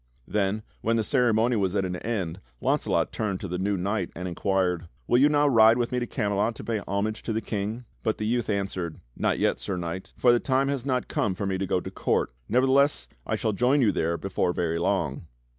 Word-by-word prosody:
Then, 105 +1 0 0.2
when 115 +1 +1
the 115 - +1
ceremony 120 -1 +2
was 95 -1 0
at 95 -2 +1
an 90 -1 -3
end 95 -5 -3 0.2
Launcelot - - +1
turned 100 -4 -2
to - - -4
the 90 +1 -3
new 100 +1 0
knight 95 0 -1
and 90 +2 -4
inquired: 90 -1 0 0.2
"Will 120 - +3
you 145 +3 +6
now 145 0 +3
ride 115 -3 +6
with 120 -1 -1
me 125 - 0
to 120 - -3
Camelot 105 +2 0
to - - -9
pay 115 -2 -1
homage 105 +3 -1
to - - -4
the 110 - 0
King?" 110 +2 -4 0.2
But 110 - 0
the 105 - -3
youth 120 +1 0
answered: 95 -5 -2 0.2
"Not - - +1
yet. - - +1
Sir 95 - -3
Knight, 85 +2 -5
for 125 - +5
the 120 - +4
time 135 +2 +1
has 140 -2 -2
not 125 -2 0
come 95 -3 0
for 100 - -3
me 95 -1 -1
to 95 - -1
go 90 - +1
to - - -7
court. - - 0 0.2
Nevertheless 130 - +3 0.2
I - - 0
shall 110 - -1
join 125 +7 +3
you 110 -5 +4
there 85 +1 0
before 95 -2 -1
very 85 -1 -1
long." 85 -4 -1
105 Hz, 225 wpm, -26 LUFS, 95-120 Hz, 0.2 s, you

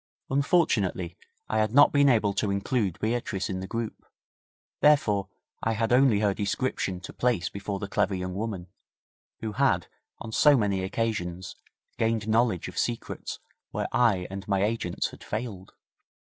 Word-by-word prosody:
Unfortunately, 115 - +1 0.3
I 110 - 0
had 110 +2 0
not 145 - +8
been 140 -1 +5
able 110 -5 +3
to 100 +1 0
include 100 -1 0
Beatrice 110 -4 -1
in 95 - -3
the 95 - -5
group, 115 +1 -4 0.8
therefore 105 -10 +3 0.3
I 115 - +1
had 115 +1 0
only 125 -5 +5
her 100 -2 +2
description 100 -2 -2
to 95 - -9
place 115 -8 0
before 100 0 -4
the 100 - -5
clever 100 -1 +1
young 90 0 -4
woman, 100 -3 -4 0.8
who 110 - -3
had, 105 - +2 0.3
on 110 - -8
so 145 +5 +5
many 100 -4 +1
occasions, 95 -3 -3 0.4
gained 110 -1 +1
knowledge 110 -5 +2
of 90 - -5
secrets 120 -1 -3 0.3
where - - -3
I 105 -7 +3
and 95 0 -6
my 100 -1 +1
agents 105 -5 -1
had - - -13
failed. 105 -4 -5
105 Hz, 155 wpm, -27 LUFS, 95-115 Hz, 0.8 s, not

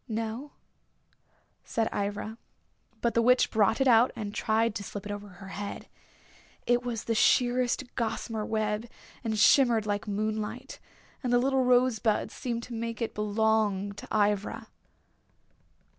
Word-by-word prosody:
"No," 225 +5 -4 1.1
said 225 -1 -1
Ivra. 205 +3 -3 0.6
But 235 - +1
the 235 - +3
Witch 250 +2 +4
brought 220 +1 +3
it 270 - +3
out 240 0 +6
and 205 -2 -5
tried 220 +1 +1
to 205 - -5
slip 200 0 -7
it 205 - -5
over 205 0 -6
her 190 0 -12
head. 200 +1 -6 0.8
It 245 0 +3
was 235 -3 -4
sheerest 245 +2 +2
gossamer 225 -2 -2
web, 215 +1 -2 0.3
and 220 -2 -1
shimmered 235 -1 +5
like 205 0 -2
moonlight. 215 +5 -3 0.4
And 250 -3 -2
the 245 - +5
little 265 +1 +2
rosebuds 245 -4 +2
seemed 235 -2 -4
to 245 - -8
make 230 -1 -4
it 230 - -2
belong 210 -1 +1
to 200 - -10
Ivra. 205 -1 0
220 Hz, 140 wpm, -28 LUFS, 210-240 Hz, 1.1 s, out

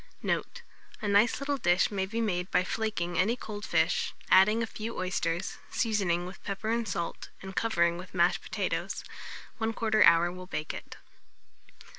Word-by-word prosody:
Note. 485 - -2 0.4
A 215 - -3
nice 205 +5 +4
little 280 0 -1
dish 175 -2 +3
may 190 -2 -1
be 225 +4 -2
made 180 -5 -1
by - - +3
flaking 185 -4 -2
any 215 +6 +3
cold 210 -4 -7
fish, 165 -1 +1 0.2
adding 215 +4 +6
a - - 0
few 225 +1 -6
oysters, 180 -1 -2
seasoning 195 -6 0
with 185 +2 -10
pepper 210 +2 -3
and 230 -1 0
salt, 170 -2 -4
and 190 0 -8
covering 170 -6 +2
with 185 +1 -10
mashed 175 0 +3
potatoes; - - -3 0.6
1/4 225 -1 +2
hour 170 +1 +6
will 185 0 -9
bake 155 -4 -4
it. - - -9
195 Hz, 160 wpm, -29 LUFS, 175-220 Hz, 0.6 s, adding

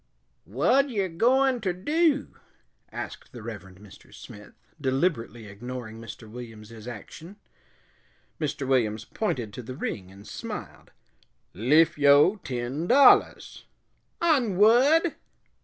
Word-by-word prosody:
"Whad 275 +1 +2
yer 200 -6 -1
goin' 250 +8 +2
ter 190 -4 -1
do?" 295 - 0 0.6
asked - - -8
the 120 -3 -10
Reverend 95 -5 -9
Mr. 105 -2 -16
Smith, 105 0 -13 0.3
deliberately 130 -5 -1
ignoring 115 +2 -8
Mr. 115 0 -10
Williams's 115 -1 -11
action. 160 +9 -10 1.0
Mr. 145 -3 -3
Williams 110 -5 0
pointed 120 - -3
to 125 - -7
the 125 +2 -8
ring 95 -8 -5
and 100 +1 -14
smiled. - - -8 0.6
"Liff 155 - +3
yo' 145 +8 +5
ten 130 +1 -4
dollahs." 275 +6 +4 0.5
"On 265 - +2
whad?" 270 - +4
135 Hz, 110 wpm, -26 LUFS, -, 1.0 s, yo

